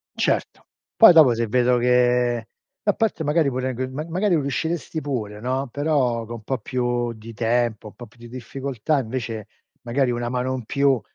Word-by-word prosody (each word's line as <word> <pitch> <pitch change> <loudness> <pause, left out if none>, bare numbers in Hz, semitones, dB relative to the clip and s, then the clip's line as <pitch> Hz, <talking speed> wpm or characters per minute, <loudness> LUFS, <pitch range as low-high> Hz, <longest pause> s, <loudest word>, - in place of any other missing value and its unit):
Certo. - - -1 0.3
Poi 225 -5 +9
dopo 155 -7 +7
se 115 0 -1
vedo 125 +2 +3
che 125 -1 +2 0.4
a 205 - +3
parte 220 -7 -1
magari 150 0 +2
pure 130 0 -2
g 130 +2 -3
ma 150 +4 -5
magari 185 +3 +1
riusciresti 160 +3 -3
pure, 110 -8 -4
no, 130 +2 -2
però 135 -6 0
con 120 +1 -7
un 110 - -11
po' 130 +2 -2
più 120 0 -1
di 115 +1 -11
tempo, 115 -1 0
un - - -13
po' 120 - -10
più 115 +2 -23
di 120 0 -11
difficoltà 135 +3 -2
invece 115 -3 -4 0.3
magari 125 +1 0
una 120 0 -2
mano 125 +1 -1
in 125 -4 -5
più, 140 -1 +2
125 Hz, 185 wpm, -23 LUFS, 120-140 Hz, 0.4 s, Poi